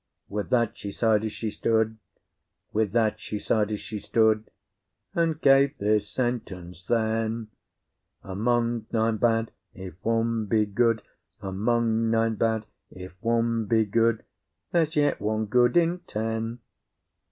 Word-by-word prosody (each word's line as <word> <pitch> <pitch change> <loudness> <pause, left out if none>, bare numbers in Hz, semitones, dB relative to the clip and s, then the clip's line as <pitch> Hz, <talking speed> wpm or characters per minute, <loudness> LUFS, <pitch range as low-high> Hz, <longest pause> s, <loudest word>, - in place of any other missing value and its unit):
With 105 0 -3
that 120 -3 +2
she 100 - -5
sighed 110 0 +2
as 110 - -2
she 110 0 -4
stood, 110 0 0 0.7
With 110 -2 +1
that 110 -2 +2
she 105 - -5
sighed 105 +1 0
as 105 - -3
she 110 -2 -6
stood, 110 +1 +2 0.6
And 165 -2 0
gave 140 -1 +4
this 105 0 +1
sentence 95 -8 -3
then: 110 +1 -1 0.7
Among 115 +3 0
nine 110 -1 +1
bad 115 0 +1 0.2
if 95 -1 -8
one 115 -1 0
be 110 +1 +2
good, 115 +1 +1 0.4
Among 115 +3 0
nine 115 0 +2
bad 110 0 0 0.2
if 90 0 -10
one 115 0 +1
be 110 +1 +2
good, 115 +2 +1 0.5
There's 160 -3 +1
yet 145 -5 +2
one 110 +1 0
good 120 +6 +3
in 170 +1 +2
ten. 115 +2 -3
110 Hz, 135 wpm, -26 LUFS, 105-115 Hz, 0.7 s, gave